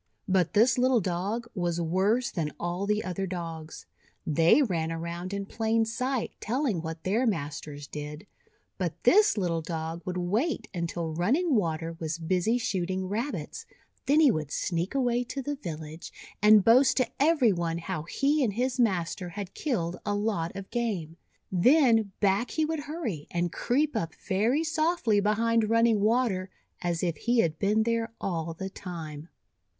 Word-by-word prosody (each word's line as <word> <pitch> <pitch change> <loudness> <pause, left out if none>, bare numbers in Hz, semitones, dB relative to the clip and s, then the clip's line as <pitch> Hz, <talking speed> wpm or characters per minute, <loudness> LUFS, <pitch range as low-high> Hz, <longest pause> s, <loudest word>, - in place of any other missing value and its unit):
But 185 -3 +2
this 230 +3 +4
little 255 -1 +4
Dog 195 +5 -2
was 175 -3 -1
worse 190 +9 +1
than 155 -5 -2
all 175 +3 -2
the 210 +1 +1
other 190 +1 -3
Dogs. 165 -3 -6 0.4
They 165 - +4
ran 165 -8 -1
around 170 +2 -5
in 200 0 -3
plain 225 +2 +1
sight 250 +2 -2
telling 235 - -1
what 160 0 -6
their 225 +7 +1
masters 150 -5 -3
did. 150 +4 -7 0.5
But 175 -3 -1
this 415 - +5
little 170 -4 0
Dog 165 0 -4
would 180 -1 -4
wait 210 - -1
until 170 -2 -3
Running 270 - +1
Water 165 -6 0
was 160 0 -3
busy 180 +7 +1
shooting 185 -4 -2
Rabbits, 230 +8 -4 0.4
then 290 +3 +5
he 290 -5 +6
would 155 -7 -3
sneak 175 - -2
away 245 -2 +1
to 275 - -5
the 290 +2 -2
village, 160 - -7 0.3
and 210 -1 +7
boast 255 +4 +5
to 255 -3 +3
every 280 -7 +4
one 170 -2 -2
how 170 -1 -4
he 275 - +1
and 220 -5 0
his 255 +3 -1
master 185 -5 0
had 200 +1 -7
killed 180 - -2
a 205 -1 -1
lot 205 -6 -1
of 195 -1 -8
game. 205 -10 -2 0.4
Then 225 - +4
back 205 +3 +2
he 315 - 0
would 320 0 -2
hurry, 260 - -4
and 175 0 -1
creep 285 +3 0
up 165 -7 -2
very 225 +10 +2
softly 315 -8 +1
behind 220 +2 +2
Running 230 -1 +4
Water 215 -4 +1 0.3
as 175 -1 -1
if 170 -4 0
he 240 +4 +2
had 160 -4 -1
been 210 +2 +2
there 230 0 -1
all 165 -3 -3
the 190 +3 -5
time. 160 -5 -7
195 Hz, 165 wpm, -28 LUFS, 170-235 Hz, 0.5 s, and